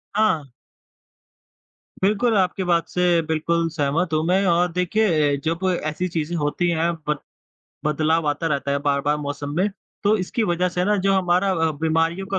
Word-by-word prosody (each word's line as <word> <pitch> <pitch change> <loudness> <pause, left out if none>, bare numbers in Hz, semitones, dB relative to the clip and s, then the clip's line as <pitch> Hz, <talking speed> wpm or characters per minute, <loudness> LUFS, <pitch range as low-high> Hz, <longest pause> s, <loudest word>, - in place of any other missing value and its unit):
हाँ। 205 -8 +2 1.6
बिल्कुल, 215 +4 +2
आपकी 190 0 +1
बात 170 -2 +1
से 175 -1 +2
बिल्कुल 165 +1 0
सहमत 160 +2 -1
हूँ 155 0 +2
मैं 190 +3 +2
और 175 0 +2
देखिए 175 -5 +1
जब 165 +1 0 0.3
ऐसी 155 +4 -2
चीज़ें 160 +1 -1
होती 150 +4 0
हैं 170 0 +1 0.2
बद 150 0 +1 0.7
बदलाव 155 +2 +1
आता 145 +3 -1
रहता 140 -3 -1
है 140 - +1
बार-बार 145 +1 +1
मौसम 145 -1 -5
में, 190 +4 +2 0.3
तो 205 +2 +3
इसकी 200 +4 -2
वज़ह 180 -2 +1
से 180 0 -1
ना 210 +2 +2
जो 195 0 +1
हमारा 185 +1 +2
अ, 165 -3 +1
बीमारियों 165 +3 0
का 195 0 -1
170 Hz, 165 wpm, -22 LUFS, 155-185 Hz, 1.6 s, तो